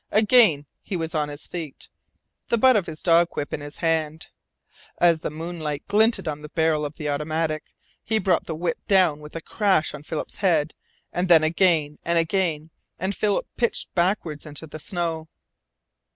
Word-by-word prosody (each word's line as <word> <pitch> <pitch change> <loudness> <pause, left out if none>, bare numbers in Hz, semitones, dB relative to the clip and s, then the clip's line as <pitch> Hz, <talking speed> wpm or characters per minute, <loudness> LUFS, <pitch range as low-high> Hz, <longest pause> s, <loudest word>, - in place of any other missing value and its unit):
Again 215 - +5 0.2
he 190 - -4
was 165 -1 -3
on 150 -2 0
his 145 0 -9
feet, 160 -6 -7 0.6
the 235 - +3
butt 255 +2 +5
of 200 -5 +1
his 155 -1 -7
dog 170 0 +5
whip 145 - -4
in - - -3
his 145 0 -9
hand. 160 -1 -1 0.7
As 170 -2 +4
the - - -3
moonlight 155 -2 -5
glinted 215 -2 +3
on 150 -1 -3
the 150 - -9
barrel 160 -2 +1
of 145 - -13
the 150 -3 -5
automatic, 155 +1 -2 0.3
he 220 - 0
brought 185 -4 +1
the 160 - -3
whip 165 +1 -2
down 180 -7 +4
with 150 +1 -12
a 165 - -4
crash 190 -4 +1
on 150 - -8
Philip's 155 +1 -5
head 160 -6 +1 0.4
and 180 +1 0
then 165 -3 +6
again 160 -3 +2
and 170 0 +1
again, 165 -2 0 0.3
and 190 +2 -2
Philip 205 -2 0
pitched 235 -2 -1
backward 170 -4 0
into 150 +1 -8
the 155 0 -9
snow. 165 -1 -3
165 Hz, 180 wpm, -24 LUFS, 150-180 Hz, 0.7 s, then